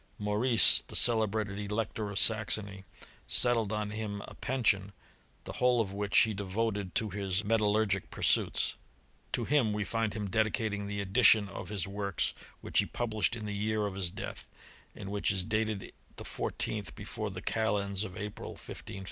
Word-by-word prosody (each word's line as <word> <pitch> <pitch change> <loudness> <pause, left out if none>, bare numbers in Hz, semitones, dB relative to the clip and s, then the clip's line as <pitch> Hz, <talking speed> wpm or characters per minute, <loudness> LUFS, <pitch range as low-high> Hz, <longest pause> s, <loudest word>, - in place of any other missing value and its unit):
Maurice, 105 +1 +5
the^ - - -1
celebrated 110 -3 +1
Elector 105 0 -3
of 100 - -5
Saxony, 100 -1 +2 0.4
settled 115 -4 +5
on 105 -1 -2
him 105 -2 -5
a - - -11
pension^ 115 -7 +1
^ 100 - -13 0.5
the - - -7
whole 125 -1 +4
of 100 -4 -1
which 100 0 0
he 110 - +2
devoted 100 -1 -3
to 110 - +1
hismetallurgicpursuitSi'"; 105 +1 +1 0.6
To 120 - 0
him 130 -6 +2
we 105 0 -1
find 110 -1 -2
him 105 -2 -3
dedicating 105 0 -1
the 100 0 -3
edition 105 +1 +5
of 95 -2 -8
his 100 -4 -2
workf 100 -1 -2 0.3
which - - 0
he - - +2
published 115 -1 -1
in 110 -2 -7
the 105 - -4
year 105 +1 -1
of 100 - -3
his 95 -2 -1
death, 95 +2 -8 0.5
and 95 - -8
whicks 100 0 0
is 95 -2 +1
dated 110 -1 -2 0.2
the - - -8
fourteenth 105 -5 -3
before 110 +1 -5
the 95 0 -8
calends 100 -3 -1
of 100 -2 -7
April, 105 -1 -7
1555i? 95 - -9
105 Hz, 165 wpm, -30 LUFS, 100-110 Hz, 0.6 s, Maurice